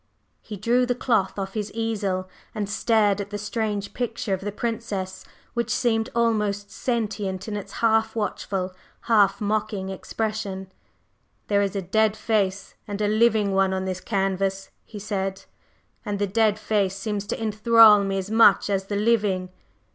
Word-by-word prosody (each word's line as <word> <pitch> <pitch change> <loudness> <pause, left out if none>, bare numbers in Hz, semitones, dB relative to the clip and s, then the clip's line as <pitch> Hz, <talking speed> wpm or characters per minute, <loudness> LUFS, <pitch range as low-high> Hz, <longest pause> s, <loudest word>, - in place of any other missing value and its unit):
He 210 -3 -8
drew 240 +5 +2
the 245 - +1
cloth 225 -7 0
off 195 -1 -4
his 210 -2 -3
easel 205 -5 -2 0.3
and 210 -2 -2
stared 210 -1 +2
at 200 - -6
the 205 - -4
strange 210 -1 -3
picture 230 -4 -2
of 190 - -2
the 205 +1 -3
Princess, 210 -4 -4 0.3
which 235 -1 -1
seemed 225 -1 +1
almost 210 -3 0
sentient 210 -6 -2
in 215 - -3
its 205 - -6
half 225 0 +2
watchful, 195 -3 -2 0.3
half 210 -4 +3
mocking 205 -2 -1
expression. 195 -1 -4 0.8
"There 200 -1 +3
is 200 0 -1
a 195 - -2
dead 215 +3 +2
face 200 -3 -1
and 205 -1 -4
a 210 - +1
living 215 -1 +3
one 190 0 +2
on 190 0 -2
this 185 -1 -3
canvas," 195 -1 -1
he 215 - -10
said, 195 -2 -3 0.6
"and 205 -2 -3
the 205 - +1
dead 210 +1 +2
face 205 -3 0
seems 205 0 -3
to - - -2
enthral 220 -1 +6
me 195 0 -1
as 195 +2 -4
much 220 -2 +5
as 195 -1 0
the 205 - -3
living. 205 -4 +1
205 Hz, 160 wpm, -24 LUFS, 195-220 Hz, 0.8 s, enthral